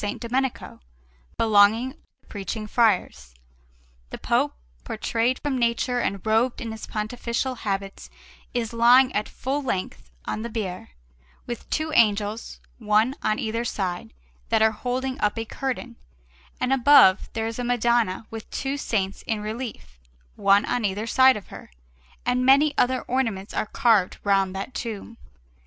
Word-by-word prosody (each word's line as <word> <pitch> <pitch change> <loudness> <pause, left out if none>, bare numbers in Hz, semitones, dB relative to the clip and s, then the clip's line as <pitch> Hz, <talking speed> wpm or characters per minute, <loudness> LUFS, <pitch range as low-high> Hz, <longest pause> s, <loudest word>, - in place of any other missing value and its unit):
Domenico, 255 +2 -3 0.6
belonging 220 +3 +4
to 295 - -19 0.2
the - - -34
Preaching 210 +2 -5
Friars; 210 - 0 0.7
the - - -7
Pope, - - 0 0.3
portrayed 235 - -1
from 275 -3 -2
nature 240 +1 +1
and 200 -4 -2
robed 225 +3 +2
in 230 - -5
his 220 -1 -8
pontifical 235 +4 -3
habits, 195 -4 -4 0.4
is 235 -2 -3
lying 245 +3 +5
at 210 - -1
full 275 +3 -3
length 185 - -4 0.2
on 215 - -3
the 235 - -5
bier, 195 - -5 0.6
with 240 -2 -7
two 310 0 -1
angels, 210 -1 +1 0.2
one 215 +3 +2
on 215 - 0
either 230 +1 -2
side, 185 -6 -3 0.4
that 220 - +3
are 220 - +5
holding 255 +3 -3
up 210 +1 +1
a 225 - -2
curtain, 250 -1 -5 0.6
and 255 - +1
above 265 -7 +6
there 225 -1 -2
is 225 +1 -4
a - - -2
Madonna 235 -4 +1
with 225 -1 -8
two 275 +1 -3
saints 195 -7 -2
in 220 -2 -1
relief, 215 - -7 0.4
one 200 +1 +4
on 245 - -1
either 205 +2 -1
side 260 +1 +5
of 205 - -11
her; - - -11 0.6
and 250 +1 +1
many 280 +3 +5
other 255 +1 +1
ornaments 225 -6 -2
are - - -1
carved 220 -8 +2
round 195 -2 +2
that 195 +6 -5
tomb. 230 0 -6
230 Hz, 150 wpm, -24 LUFS, 210-250 Hz, 0.7 s, above